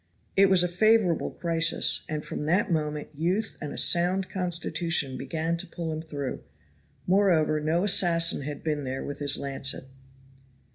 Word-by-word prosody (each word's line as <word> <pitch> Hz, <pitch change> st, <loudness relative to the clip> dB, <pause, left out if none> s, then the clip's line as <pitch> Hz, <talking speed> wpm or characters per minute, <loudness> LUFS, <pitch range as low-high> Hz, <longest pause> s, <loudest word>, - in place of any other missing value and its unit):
It 195 Hz, 0 st, +5 dB
was 185 Hz, -2 st, +4 dB
a -, -, +2 dB
favorable 195 Hz, -1 st, +2 dB
crisis, 165 Hz, -1 st, +1 dB
and 155 Hz, -1 st, -3 dB
from 150 Hz, -, -4 dB
that 185 Hz, +5 st, +1 dB
moment 150 Hz, -2 st, -2 dB
youth 180 Hz, +8 st, -1 dB
and 150 Hz, -2 st, -5 dB
a -, -, -7 dB
sound 180 Hz, +2 st, +2 dB
constitution 170 Hz, -5 st, 0 dB
began 165 Hz, +3 st, -2 dB
to -, -, -4 dB
pull 165 Hz, -1 st, -5 dB
him 155 Hz, -, -4 dB
through; 145 Hz, -4 st, -5 dB, 0.6 s
moreover 180 Hz, -5 st, +3 dB
no 160 Hz, +4 st, 0 dB
assassin 170 Hz, -5 st, +2 dB
had 145 Hz, +1 st, -6 dB
been 150 Hz, -2 st, -1 dB
there 130 Hz, 0 st, -4 dB
with 145 Hz, -, -6 dB
his 145 Hz, -1 st, +2 dB
lancet. 135 Hz, -1 st, -4 dB
165 Hz, 155 wpm, -27 LUFS, 150-180 Hz, 0.6 s, It